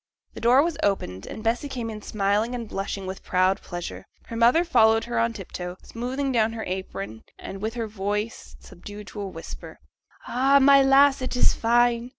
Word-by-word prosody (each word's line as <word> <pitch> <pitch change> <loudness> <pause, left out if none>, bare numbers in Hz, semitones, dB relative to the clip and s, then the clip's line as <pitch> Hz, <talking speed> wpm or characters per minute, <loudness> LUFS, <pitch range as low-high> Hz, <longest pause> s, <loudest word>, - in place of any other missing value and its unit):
The - - -9
door 250 +4 +5
was 330 -3 -2
opened, 95 - -1
and 220 - -8
Bessy 235 +5 0
came 245 -4 -4
in 215 -1 -8
smiling 210 +4 0
and 235 -2 -5
blushing 195 -1 -4
with 190 0 -6
proud 185 +2 +1
pleasure. 175 -1 -7 0.2
Her 230 - -8
mother 240 +10 +4
followed 225 -8 +4
her 240 -1 -2
on 230 0 +2
tip 200 -5 -10
toe, 180 0 -6
smoothing 260 +4 -3
down 225 -2 +2
her 225 -1 -5
apron, 110 - -5 0.2
and 195 0 -8
with 220 +2 -3
her 230 -2 -2
voice 210 +1 -4
subdued 205 +4 -11
to 210 - -7
a 200 - -4
whisper: 165 -3 -9 0.5
'Ay, 270 +3 +4
my 275 0 +7
lass, 270 0 +5
it 255 - -3
is 245 - +4
fine! 240 +1 +2
225 Hz, 190 wpm, -25 LUFS, 195-245 Hz, 0.5 s, my